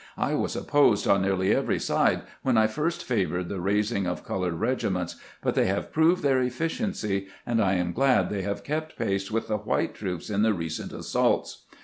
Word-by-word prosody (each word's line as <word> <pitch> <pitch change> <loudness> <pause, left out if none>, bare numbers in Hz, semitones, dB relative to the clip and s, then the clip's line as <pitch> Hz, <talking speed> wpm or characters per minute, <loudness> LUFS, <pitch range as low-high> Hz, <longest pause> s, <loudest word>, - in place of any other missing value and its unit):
I - - 0
was - - -1
opposed 145 -8 +3
on 100 -1 +4
nearly 95 -1 +2
every - - +1
side - - +1 0.2
when 130 -3 +2
I 110 - +5
first 150 +10 -1
favored 90 -6 -1
the 100 - -3
raising 100 +1 0
of 90 - -4
colored 90 -3 -2
regiments; 95 -5 -1 0.3
but - - +1
they - - +2
have 95 +1 -2
proved 170 +3 +3
their 135 -2 +3
efficiency, 125 - -2 0.2
and 115 -1 +1
I 95 -2 +2
am 90 -1 -1
glad 135 -1 +3
they 100 -2 -1
have 100 +1 -3
kept 155 +2 -3
pace 100 -4 -1
with 115 +1 -1
the 105 - 0
white 105 +1 -1
troops 95 -1 -5
in 100 0 +1
the 110 -1 +3
recent 80 -2 -4
assaults. - - -1
105 Hz, 195 wpm, -26 LUFS, 95-130 Hz, 0.3 s, I